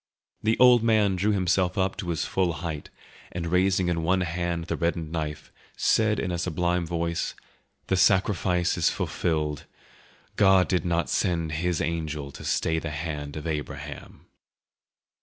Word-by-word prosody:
The 110 +1 +1
old 125 -2 +7
man 110 -4 +3
drew 100 +4 +1
himself 95 -1 +1
up 95 0 +1
to 90 - -4
his 80 -3 -1
full 90 -3 0
height, 80 -1 -5 0.4
and 85 -1 -4
raising 95 0 +2
in 85 -2 0
one 95 +3 +2
hand 85 -1 -2
the - - -2
reddened 85 -2 -2
knife, 75 -2 -4 0.3
said 110 -1 +2
in 90 - -2
a 85 - -2
sublime 90 0 0
voice, 85 0 -2 0.5
"The 95 - +1
sacrifice 90 -2 +2
is 80 - +4
fulfilled. 75 -2 -2 0.7
God 95 -2 +5
did 90 -2 0
not 85 -2 0
send 85 -3 0
His 85 +2 -1
angel 80 -4 -3
to - - -11
stay 80 0 0
the 80 - -5
hand 75 -1 -5
of 75 - -7
Abraham." 75 -3 -6
85 Hz, 155 wpm, -26 LUFS, 80-95 Hz, 0.7 s, old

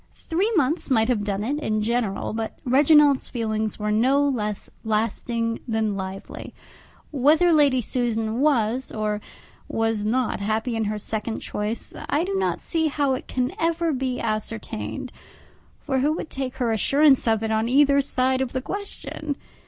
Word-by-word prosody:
Three 375 +7 -1
months 310 0 +1
might 225 -3 +3
have 225 -5 +1
done 205 0 -2
it 285 +6 -1
in 215 -7 -1
general, 225 -4 -1
but 225 0 -4
Reginald's 285 +1 +5
feelings 220 -2 -2
were 210 0 -2
no 265 +6 +3
less 210 -6 -2 0.2
lasting 230 +1 -1
than 220 -3 0
lively. 190 0 -7 0.6
Whether 310 +5 +4
Lady 285 -4 +4
Susan 230 -1 -1
was 260 -3 +1
or 215 -1 -2 0.5
was 225 -2 0
not 240 +2 0
happy 220 +4 -1
in 225 -1 0
her 210 +1 -2
second 220 +2 -2
choice, 210 +2 -4 0.2
I 300 +2 +2
do 390 +2 -3
not 385 - 0
see 320 -2 0
how 285 -2 +1
it 255 - -5
can 250 0 -1
ever 330 -1 +1
be 255 -1 -2
ascertained; 220 0 -4 0.7
for 270 -3 -1
who 295 +4 +2
would 320 - -6
take 265 -1 -4
her 245 -3 0
assurance 275 +5 +4
of 220 -1 +2
it 220 - -1
on 220 +1 +1
either 280 +1 +5
side 260 -1 0
of 260 -2 -2
the 260 - -1
question? 385 -6 -5
245 Hz, 160 wpm, -24 LUFS, 220-280 Hz, 0.7 s, Reginald's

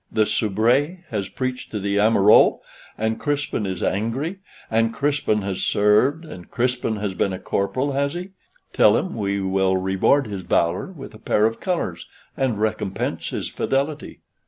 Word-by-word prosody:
the 110 -1 +2
soubrette 120 - +1
has 100 -4 -3
peached 130 -1 -4
to 105 - -4
the 100 +1 -1
amoureux, 105 -1 +5 0.4
and 110 +1 -1
Crispin 145 -8 -1
is 95 -2 -4
angry, 130 - -1 0.3
and 115 0 +2
Crispin 140 -8 0
has 95 -1 -3
served, 115 +11 +2
and 90 - -11
Crispin 125 -2 -1
has 105 -2 -3
been 95 - 0
a 95 - -3
corporal, 130 +10 -1
has 140 +3 -1
he? 180 +2 -6 0.4
Tell - - +5
him 190 - -3
we 100 -2 -1
will 95 0 +1
reward 95 +9 +2
his 100 -3 -5
valor 85 0 0
with 165 -11 -10
a 110 - -13
pair 105 - +2
of 115 0 -1
colors, 165 - -3 0.3
and 125 -6 -1
recompense 105 -3 -2
his - - -4
fidelity." 140 +2 -2
110 Hz, 160 wpm, -22 LUFS, 100-140 Hz, 0.4 s, amoureux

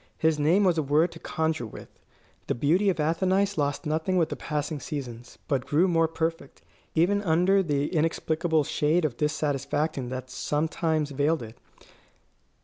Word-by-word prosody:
His 160 -1 +2
name 165 +8 +3
was 175 -4 +3
a - - +3
word 150 +4 +2
to 165 - -11
conjure 160 -8 -2
with. - - -13 0.5
The - - 0
beauty 170 - +2
of 180 - -1
Athenais 190 +6 +1
lost 145 +2 -1
nothing 160 +5 0
with 165 -3 +2
the - - -3
passing 150 0 -3
seasons, 125 -5 -7
but 135 -3 -1
grew 165 +6 +3
more 165 -2 +3
perfect, 165 0 -4 0.3
even 190 +5 +3
under 185 +2 +3
the 145 -5 0
inexplicable 160 0 +1
shade 155 +4 +1
of 135 -6 -2
dissatisfaction 145 -2 -1
that 130 0 -6
sometimes 155 +1 -1
veiled 145 +1 +1
it. 110 0 -10
155 Hz, 155 wpm, -26 LUFS, 145-165 Hz, 0.5 s, name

